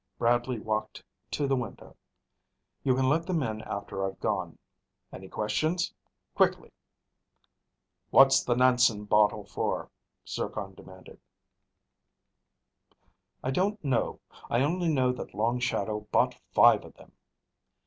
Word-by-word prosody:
Bradley 120 Hz, +1 st, +1 dB
walked 110 Hz, 0 st, -3 dB, 0.3 s
to 145 Hz, -, -1 dB
the 135 Hz, -1 st, +2 dB
window. 120 Hz, -5 st, -6 dB, 0.9 s
"You 130 Hz, -2 st, +3 dB
can 130 Hz, 0 st, +1 dB
let 160 Hz, +5 st, +1 dB
them 170 Hz, -5 st, 0 dB
in 110 Hz, -3 st, -3 dB
after 100 Hz, -2 st, -5 dB
I've 95 Hz, 0 st, -4 dB
gone. -, -, -2 dB, 0.6 s
Any 95 Hz, 0 st, -9 dB
questions? 155 Hz, +12 st, -1 dB, 0.4 s
Quickly!" -, -, +1 dB, 1.4 s
"What's 135 Hz, 0 st, +6 dB
the 120 Hz, -, +1 dB
Nansen 125 Hz, -4 st, +3 dB
bottle 105 Hz, 0 st, +3 dB
for?" -, -, -3 dB, 0.4 s
Zircon -, -, -4 dB
demanded. -, -, -14 dB, 2.2 s
"I 130 Hz, -, -1 dB
don't 195 Hz, +4 st, -1 dB
know. 130 Hz, -4 st, 0 dB, 0.3 s
I 120 Hz, -, +2 dB
only 175 Hz, +4 st, 0 dB
know 130 Hz, -5 st, +2 dB
that 125 Hz, -, -8 dB
Long 120 Hz, +3 st, 0 dB
Shadow 105 Hz, -3 st, -1 dB
bought -, -, +3 dB, 0.2 s
five -, -, +6 dB
of -, -, -14 dB
them." -, -, -18 dB
125 Hz, 120 wpm, -28 LUFS, 105-140 Hz, 2.2 s, What's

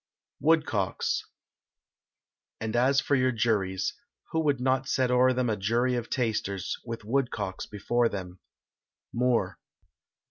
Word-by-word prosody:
WOODCOCKS. 145 Hz, -12 st, +1 dB, 1.3 s
And 110 Hz, 0 st, -3 dB
as 130 Hz, +3 st, +4 dB
for 145 Hz, -, -1 dB
your 130 Hz, -1 st, +3 dB
juries 105 Hz, -5 st, 0 dB, 0.4 s
who 160 Hz, -, +1 dB
would 145 Hz, -4 st, +1 dB
not 130 Hz, +1 st, +1 dB
set 130 Hz, -2 st, +1 dB
o'er 125 Hz, +1 st, +5 dB
them 125 Hz, -1 st, 0 dB
A 110 Hz, -, +1 dB
jury 115 Hz, +5 st, +1 dB
of 120 Hz, -1 st, -2 dB
tasters, 105 Hz, -6 st, -1 dB
with 115 Hz, -2 st, -6 dB
woodcocks 110 Hz, -6 st, -1 dB
before 115 Hz, +3 st, +1 dB
them? 90 Hz, -2 st, -6 dB, 0.7 s
MOORE. 115 Hz, -6 st, +1 dB
120 Hz, 120 wpm, -28 LUFS, 105-130 Hz, 1.3 s, o'er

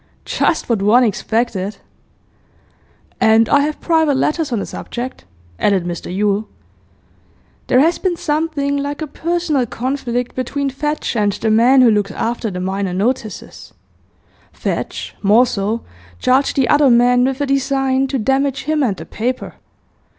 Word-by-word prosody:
'Just 325 Hz, -, 0 dB
what 230 Hz, -5 st, 0 dB
one 225 Hz, +5 st, +5 dB
expected!' 215 Hz, -2 st, -1 dB, 1.4 s
'And 220 Hz, 0 st, +4 dB
I 285 Hz, -, +4 dB
have 300 Hz, +1 st, -1 dB
private 320 Hz, -4 st, +2 dB
letters 305 Hz, +1 st, 0 dB
on 235 Hz, -, 0 dB
the 200 Hz, -, -3 dB
subject,' 245 Hz, -, -7 dB, 0.3 s
added 195 Hz, -4 st, +2 dB
Mr 175 Hz, 0 st, -5 dB
Yule. 205 Hz, +2 st, 0 dB, 1.2 s
'There 255 Hz, -, +4 dB
has 330 Hz, +3 st, +2 dB
been 360 Hz, -3 st, -1 dB
something 295 Hz, -3 st, -1 dB
like 285 Hz, +2 st, -3 dB
a -, -, -2 dB
personal 320 Hz, -3 st, -1 dB
conflict 245 Hz, 0 st, -3 dB
between 275 Hz, +2 st, -2 dB
Fadge 295 Hz, 0 st, -3 dB
and 205 Hz, -2 st, +1 dB
the 220 Hz, +2 st, -1 dB
man 250 Hz, +4 st, +5 dB
who 235 Hz, -, +6 dB
looks 205 Hz, -2 st, +1 dB
after 230 Hz, +3 st, -2 dB
the 180 Hz, -2 st, -5 dB
minor 190 Hz, 0 st, -2 dB
notices. 215 Hz, +1 st, -3 dB, 0.8 s
Fadge, -, -, -4 dB
more 215 Hz, +5 st, +5 dB
so, 220 Hz, +1 st, -2 dB, 0.3 s
charged 260 Hz, -, +2 dB
the 265 Hz, -3 st, +2 dB
other 290 Hz, -2 st, +4 dB
man 245 Hz, +1 st, +4 dB
with 265 Hz, +1 st, 0 dB
a 285 Hz, -, 0 dB
design 270 Hz, -1 st, +1 dB
to 270 Hz, 0 st, -2 dB
damage 270 Hz, +3 st, 0 dB
him 305 Hz, +2 st, 0 dB
and 215 Hz, -8 st, 0 dB
the -, -, -8 dB
paper. 245 Hz, +4 st, -3 dB
250 Hz, 150 wpm, -18 LUFS, 215-280 Hz, 1.4 s, who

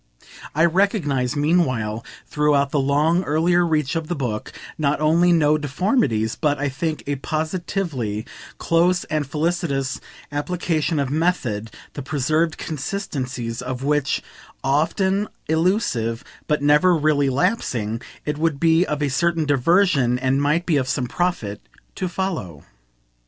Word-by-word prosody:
I 160 Hz, +2 st, +4 dB
recognise 160 Hz, -, +1 dB
meanwhile, 130 Hz, -9 st, +1 dB, 0.2 s
throughout 145 Hz, -2 st, +1 dB
the 145 Hz, -, +1 dB
long 150 Hz, +6 st, +2 dB
earlier 170 Hz, +3 st, +2 dB
reach 155 Hz, -3 st, 0 dB
of 165 Hz, -1 st, -2 dB
the 175 Hz, -, -2 dB
book, 120 Hz, -6 st, -3 dB, 0.2 s
not 145 Hz, -1 st, 0 dB
only 165 Hz, +3 st, +4 dB
no 155 Hz, -2 st, +3 dB
deformities 140 Hz, -, 0 dB
but, 145 Hz, -2 st, 0 dB
I 145 Hz, +1 st, -1 dB
think, 155 Hz, +4 st, -3 dB
a 145 Hz, 0 st, -2 dB
positively 155 Hz, -, -3 dB, 0.3 s
close 175 Hz, +1 st, +2 dB
and 155 Hz, -3 st, 0 dB
felicitous 150 Hz, -3 st, -1 dB, 0.3 s
application 160 Hz, +1 st, -1 dB
of 135 Hz, -2 st, -1 dB
method, 140 Hz, -10 st, 0 dB, 0.2 s
the 145 Hz, -, -5 dB
preserved 155 Hz, +4 st, 0 dB
consistencies 130 Hz, -, -4 dB
of 125 Hz, +1 st, -5 dB
which, 145 Hz, -1 st, 0 dB, 0.4 s
often 190 Hz, +8 st, +1 dB, 0.2 s
illusive, 160 Hz, -, 0 dB, 0.2 s
but 150 Hz, -1 st, 0 dB
never 150 Hz, +5 st, +5 dB
really 150 Hz, -3 st, +2 dB
lapsing, 120 Hz, -, -1 dB, 0.2 s
it 150 Hz, 0 st, -2 dB
would 160 Hz, -3 st, 0 dB
be 165 Hz, +1 st, +4 dB
of 150 Hz, 0 st, -2 dB
a 145 Hz, -, +1 dB
certain 165 Hz, +4 st, +1 dB
diversion, 145 Hz, -2 st, +3 dB
and 130 Hz, +2 st, +1 dB
might 150 Hz, +5 st, +1 dB
be 160 Hz, -4 st, +2 dB
of 130 Hz, -2 st, 0 dB
some 130 Hz, -1 st, -1 dB
profit, 125 Hz, -, -2 dB, 0.3 s
to 185 Hz, -, -3 dB
follow. 150 Hz, -, -4 dB
150 Hz, 135 wpm, -22 LUFS, 135-170 Hz, 0.4 s, never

